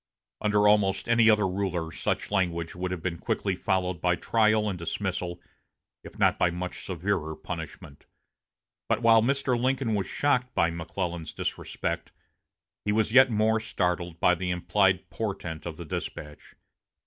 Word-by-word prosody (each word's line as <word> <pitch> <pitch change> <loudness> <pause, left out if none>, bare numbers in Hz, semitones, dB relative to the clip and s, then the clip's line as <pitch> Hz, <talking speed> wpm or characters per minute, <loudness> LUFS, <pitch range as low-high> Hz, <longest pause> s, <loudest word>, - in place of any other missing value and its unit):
Under 105 0 +3
almost 105 -2 +3
any 115 -1 +5
other 105 -2 +4
ruler 90 -3 -2
such - - -2
language 85 -4 0
would 90 +1 -3
have 90 -3 -5
been 85 -3 -3
quickly 95 -2 -1
followed 90 -2 -1
by 90 -1 +2
trial 110 +1 +2
and 95 -4 -3
dismissal, 90 0 -3 0.6
if - - -12
not - - +3
by 90 - +4
much 90 +1 -5
severer 85 -3 -2
punishment. 70 -1 -8 0.8
But 115 - +1
while 115 -1 +6
Mr. 135 +1 +1
Lincoln 130 -2 +1
was 100 -2 -1
shocked 125 -3 0
by 85 - +3
McClellan's 85 0 -4
disrespect, - - -4 0.7
he 105 - 0
was 110 0 +1
yet 130 +1 +7
more 110 0 +2
startled 90 -5 -2
by 90 - +4
the 90 +1 -3
implied 95 +1 +2
portent 90 -7 -4
of 80 -2 -6
the 85 - -7
despatch. 75 0 -7
95 Hz, 150 wpm, -27 LUFS, 85-110 Hz, 0.8 s, yet